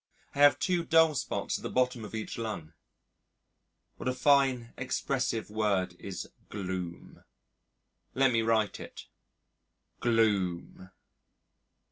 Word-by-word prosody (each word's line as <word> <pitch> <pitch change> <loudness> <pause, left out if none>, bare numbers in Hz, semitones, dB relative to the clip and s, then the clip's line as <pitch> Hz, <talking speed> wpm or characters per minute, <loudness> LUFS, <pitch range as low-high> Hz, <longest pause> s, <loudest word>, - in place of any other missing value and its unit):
I 140 - -7
have 145 0 +7
two 180 -2 0
dull 165 -1 +5
spots 135 - -2
at - - -14
the - - -4
bottom 125 -2 0
of 105 - -7
each 110 - -4
lung. 105 -9 -5 1.2
What - - -2
a 130 - -2
fine 130 -4 +3
expressive 125 -4 -2
word 100 -5 0
is 95 -2 -6 0.2
gloom. 90 -4 -6 0.9
Let 135 -1 +4
me 115 -1 +2
write 110 -2 +1
it: - - -9 0.9
GLOOM.... 100 -6 0
115 Hz, 115 wpm, -30 LUFS, 100-130 Hz, 1.2 s, have